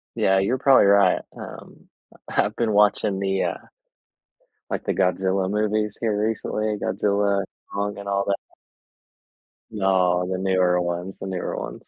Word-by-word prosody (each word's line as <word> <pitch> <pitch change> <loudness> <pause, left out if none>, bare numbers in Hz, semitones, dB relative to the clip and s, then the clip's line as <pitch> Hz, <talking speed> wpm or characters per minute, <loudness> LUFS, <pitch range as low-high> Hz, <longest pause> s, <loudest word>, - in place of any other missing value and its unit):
Yeah. 95 0 +3
You're 120 +7 +1
probably 135 -5 +5
right. 100 -2 +4 0.2
Um, - - -11 0.4
I've 105 +2 0
been 115 -3 0
watching 105 -1 +3
the, 95 -1 0
uh - - -2 1.1
like, - - -3
the - - 0
Godzilla 95 +1 +1
movies 105 0 0
here 110 -3 0
recently, 110 -1 -2
Godzilla, 100 0 +1 0.3
Kong, 100 0 -2
and 100 0 -8
all 100 0 +1
that. 100 - +1 1.4
No, 90 -3 +2
the 95 - -1
newer 90 -2 +2
ones, 90 +2 -4
the 95 - -6
newer 95 -2 -3
ones. - - -7
100 Hz, 140 wpm, -23 LUFS, 95-105 Hz, 1.4 s, probably